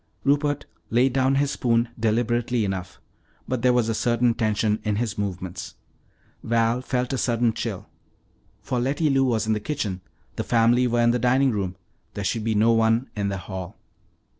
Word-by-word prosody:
Rupert 145 +1 +1 0.2
laid 125 +3 +3
down 135 0 +2
his 140 +1 +1
spoon 115 -3 +1
deliberately 120 +1 +1
enough, 95 -2 -5 0.5
but 130 -2 -2
there 125 +1 +4
was 125 -2 +2
a 115 - 0
certain 120 +1 +2
tension 110 -2 0
in 105 -1 0
his 115 +1 -2
movements. 95 -3 -5 0.7
Val 115 +1 +1
felt 125 0 -2
a 130 - -1
sudden 120 -1 +1
chill. - - -4 0.8
For 125 - -1
Letty 140 +5 +1
Lou 135 0 +3
was 115 -3 +1
in 110 - +1
the 105 - -1
kitchen, 105 -7 -3 0.4
the - - -1
family 120 +2 +3
were 120 0 +1
in 120 0 +4
the 125 - 0
dining 130 +3 +3
room. 95 -4 -2 0.4
There 100 - -3
should 110 +3 -1
be 110 0 0
no 110 +3 +4
one 115 +2 +2
in 100 -1 -1
the 100 - -3
hall. 95 +1 -7
115 Hz, 180 wpm, -24 LUFS, 105-125 Hz, 0.8 s, there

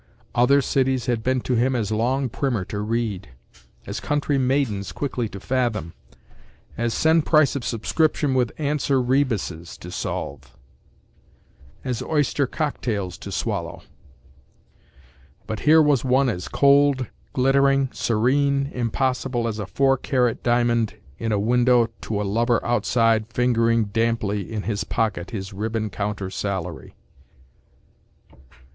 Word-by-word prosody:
Other 135 +3 +4
cities 130 -2 +1
had 120 -2 0
been 130 +2 0
to 125 - -2
him 125 +2 +2
as 110 -4 -1
long 125 +5 +1
primer 120 -5 -2
to 105 - -5
read; 105 - -2 0.6
as 100 +3 -4
country 145 +1 0
maidens 125 -7 0
quickly 125 -5 -3
to 100 - -8
fathom; 115 -9 -1 0.8
as 120 0 -1
send 160 0 +3
price 155 -4 +4
of 140 - -3
subscription 145 +5 0
with 125 -3 +1
answer 145 -2 0
rebuses 120 - -1
to 90 - -10
solve; - - -5 1.3
as 125 -4 -3
oyster 145 -2 0
cocktails 110 - -3
to - - -8
swallow; - - -3 1.6
but 110 -2 -4
here 160 0 +7
was 145 -5 +2
one 130 +1 +3
as 90 -6 -4
cold, 140 -2 +4 0.3
glittering, 135 +1 +3
serene, 140 +5 +1
impossible 125 0 -1
as 110 -1 -3
a 100 - -4
four 135 +4 +2
carat 125 -3 0
diamond 120 -2 +1 0.2
in 115 -1 -2
a 105 - +2
window 120 +2 +3
to 105 -2 -3
a - - -1
lover 115 +4 +1
outside 115 -2 +2
fingering 115 -2 +2
damply 105 -2 -1
in 105 -2 -3
his 105 -2 -2
pocket 100 -4 -2
his 100 -2 -6
ribbon 110 +1 -3
counter 100 -2 -3
salary. 95 -4 -4
120 Hz, 130 wpm, -23 LUFS, 110-135 Hz, 1.6 s, here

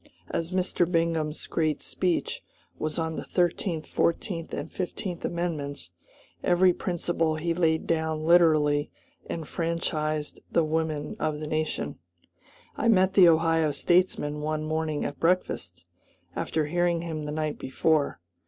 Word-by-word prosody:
As 165 0 -1
Mr. 180 -1 0
Bingham's 165 -2 0
great 155 -2 -1
speech 180 -2 -1 0.4
was 155 0 -2
on 160 -1 -2
the - - -4
Thirteenth, 175 -2 0
Fourteenth, 165 0 -1
and - - -5
Fifteenth 180 -1 -4
Amendments, 150 - -3 0.5
every 180 +1 +4
principle 170 -3 -1
he 165 +2 -1
laid 165 -2 +1
down 160 -1 0
literally 155 -4 +4 0.4
enfranchised 155 -2 -2
the 170 - +3
women 155 -1 -1
of 155 -1 -1
the 155 - -4
nation. 155 +1 -2 0.8
I - - 0
met 190 -4 +4
the 185 -3 +8
Ohio 165 -1 +3
statesman 150 -1 +1
one 155 0 -1
morning 155 -1 -1
at 145 - -5
breakfast, 90 - 0 0.5
after 155 -1 -1
hearing 170 +1 +1
him 160 -2 -4
the 150 0 -4
night 155 0 -2
before. 145 - +1
160 Hz, 130 wpm, -27 LUFS, 155-170 Hz, 0.8 s, the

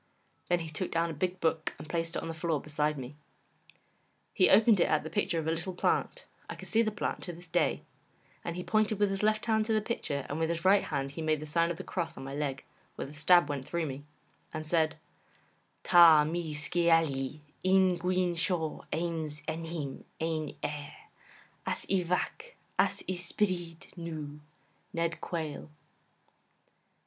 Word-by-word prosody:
Then 175 -1 +3
he 165 - -5
took 160 +4 -3
down 165 0 0
a - - -5
big 180 +4 -2
book 160 -1 0
and - - -9
placed 165 +1 -2
it - - -2
on - - -4
the 165 - -3
floor 160 -1 -1
beside 150 0 -1
me. 130 +2 -7 1.2
He 185 - +5
opened 215 0 +6
it - - +5
at 155 - +2
the 160 - -6
picture 170 - 0
of 160 - -1
a 160 - +1
little 175 +3 -3
plant - - 0 0.2
I - - -4
can - - -10
see 225 - +3
the 220 - +2
plant 210 - -3
to 175 - -5
this 175 +1 -11
day - - +1 0.6
and 170 - -3
he 180 - -4
pointed 215 +1 +2
with 205 -1 +2
his 195 - -2
left 215 0 +2
hand 220 -2 +2
to 225 - +2
the 215 - +4
picture, 155 - -2
and 145 - -3
with 165 0 +1
his 170 0 -2
right 195 +1 +5
hand 140 -2 -2
he 155 - -6
made 155 -1 +1
the 155 - -6
sign 170 +2 +2
of 170 - -3
the - - -6
cross 175 -3 -3
on - - -7
my 135 +1 -6
leg, 140 -2 -2 0.3
where - - -4
the 140 - -10
stab 170 +2 +5
went 140 -2 -4
through 170 -1 0
me, 140 -1 -5 0.5
and 155 -1 -5
said: 160 0 +2 0.9
'Ta 165 -3 +8
mee 160 0 -2
skeaylley 155 -3 +1 0.2
yn 185 -1 +4
guin 180 0 +1
shoh 165 -2 -1
ayns 160 -3 -2
ennym 160 -3 -4 0.2
yn 160 -2 -2
Ayr, 145 -1 -4 0.7
as - - -2
y 190 -1 +2
Vac, 180 - -2 0.2
as - - +2
y 185 - 0
Spyrryd 175 -2 -3
Noo, 155 -4 -6 0.5
Ned 170 -1 -1
Quayle. 160 -3 -4
165 Hz, 190 wpm, -31 LUFS, 155-180 Hz, 1.2 s, Ta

